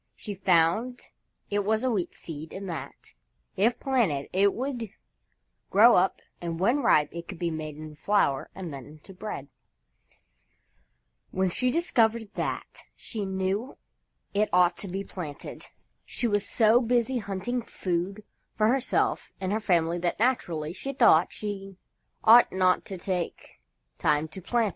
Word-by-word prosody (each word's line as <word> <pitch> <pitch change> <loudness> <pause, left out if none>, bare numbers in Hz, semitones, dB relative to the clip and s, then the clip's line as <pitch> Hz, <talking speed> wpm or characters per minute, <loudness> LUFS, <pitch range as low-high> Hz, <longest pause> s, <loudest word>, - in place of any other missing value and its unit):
She 210 - -6
found 190 +6 +2 0.5
it 205 0 +1
was 220 +3 +1
a 260 - +2
Wheat 195 -6 -2
Seed 155 -1 -8
and 195 0 -6
that, 170 -3 -7 0.4
if 225 +5 +2
planted, 210 - 0
it 195 +2 +4
would 245 -4 -3 0.8
grow 225 +5 +7
up 185 +1 +2 0.2
and 165 -1 -4
when 235 +9 +3
ripe 150 - +4
it 170 0 -7
could 190 - -7
be 170 0 -1
made 155 -1 -5
into 155 0 -9
flour 155 -5 +1
and 180 -5 -6
then 135 -3 -8
into 155 +6 -14
bread. 185 -7 -6 1.8
When 190 -1 0
she 250 +7 +1
discovered 230 -8 +1
that, - - -4
she 210 -3 -5
knew 190 +6 -2 0.6
it 210 +1 +2
ought 180 -1 +4
to 200 - -5
be 195 +2 -4
planted. 165 -7 -8 0.4
She 240 - -2
was 205 -2 0
so 225 +1 +4
busy 245 +1 +1
hunting 205 +4 -3
food 190 0 -3 0.3
for 215 0 +4
herself 260 +1 0
and 190 -1 -2
her 215 - +1
family 175 -4 +1
that, 175 0 -1
naturally, 175 -10 0
she 275 +8 -5
thought 165 -10 +5
she 195 -2 -6 0.5
ought 230 +2 +8
not 185 -1 +2
to 190 - -5
take 180 - -4 0.4
time 150 +1 +2
to 190 - -8
plant 235 +5 +1
it. - - 0
195 Hz, 155 wpm, -27 LUFS, 170-225 Hz, 1.8 s, ought